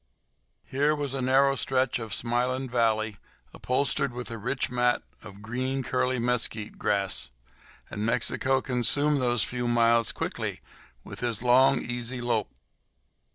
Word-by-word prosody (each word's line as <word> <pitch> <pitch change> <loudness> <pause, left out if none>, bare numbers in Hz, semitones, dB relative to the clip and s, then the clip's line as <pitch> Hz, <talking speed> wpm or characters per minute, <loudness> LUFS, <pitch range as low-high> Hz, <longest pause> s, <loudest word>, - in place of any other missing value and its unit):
Here 145 +3 +1
was 145 -3 -3
a 135 - -2
narrow 135 +2 +3
stretch 130 0 0
of 110 -2 -6
smiling 125 +4 -1
valley, 110 -3 0 0.4
upholstered 140 +1 0
with 125 -1 -6
a 115 - -5
rich 130 +6 -2
mat 125 0 +1 0.2
of 100 -1 -12
green, 130 +4 -2
curly 130 0 0
mesquite 115 -3 -2
grass; 100 -10 +1 0.6
and 105 - -4
Mexico 130 +3 +1
consumed 135 +4 +1
those 120 -3 +1
few 125 -1 -3
miles 115 -1 +3
quickly - - -4 0.4
with - - -9
his 120 -2 -2
long, 130 +2 +5
easy 120 +1 -3
lope. 120 -3 0
125 Hz, 135 wpm, -27 LUFS, 115-130 Hz, 0.6 s, long